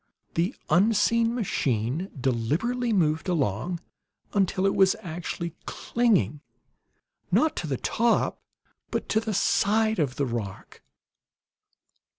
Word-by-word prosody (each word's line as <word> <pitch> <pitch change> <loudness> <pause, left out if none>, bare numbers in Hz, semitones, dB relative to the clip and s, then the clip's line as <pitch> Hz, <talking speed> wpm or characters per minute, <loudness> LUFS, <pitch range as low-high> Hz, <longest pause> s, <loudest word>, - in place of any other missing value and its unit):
The 175 +8 0 0.2
unseen 225 +4 +3
machine 140 - -1
deliberately 155 - 0
moved 160 -4 +1
along 155 - -1 0.5
until 190 -1 +1
it 195 - +3
was 190 -1 +4
actually 170 -1 -5
clinging, 225 -11 +1 0.9
not 315 0 +3
to 165 - -3
the 135 -3 -1
top, 230 - +1 0.5
but - - -3
to 220 - +3
the 220 -2 -3
side 220 +2 +2
of 135 -4 0
the 140 - 0
rock. 115 -6 -6
180 Hz, 110 wpm, -26 LUFS, 145-220 Hz, 0.9 s, was